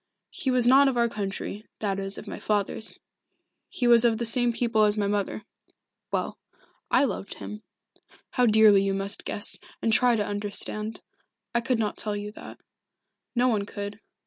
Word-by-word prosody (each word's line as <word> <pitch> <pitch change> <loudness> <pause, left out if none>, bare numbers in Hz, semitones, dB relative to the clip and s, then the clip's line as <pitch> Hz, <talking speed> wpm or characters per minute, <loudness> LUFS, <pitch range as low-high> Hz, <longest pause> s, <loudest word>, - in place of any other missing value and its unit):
He 265 - -3
was 250 -2 +2
not 270 +3 +6
of 260 -2 0
our 235 0 +3
country 205 -1 -5
that 195 -2 -2
is, 195 0 -4
of - - -9
my - - -6
father's. 210 +1 -2 0.7
He 250 - -3
was 235 -1 +6
of 230 -2 +3
the 235 - -2
same 240 +1 +1
people 230 -2 +2
as 210 0 +2
my 205 - +1
mother. 205 +1 -2 0.7
Well - - -2 0.5
I - - +4
loved 200 -6 -3
him. 210 0 -8 0.7
How 250 -2 +3
dearly 215 -2 +6
you 195 0 0
must 195 +1 0
guess, 205 - 0 0.2
and 225 - +1
try 245 0 +4
to 210 -2 0
understand. 205 +1 -1 0.5
I 235 - +2
could 245 +1 0
not 215 -2 -2
tell 210 -1 +1
you 205 0 -6
that. - - -11 0.8
No 245 +1 +3
one 210 -4 0
could. 205 +1 -6
215 Hz, 175 wpm, -26 LUFS, 205-235 Hz, 0.8 s, not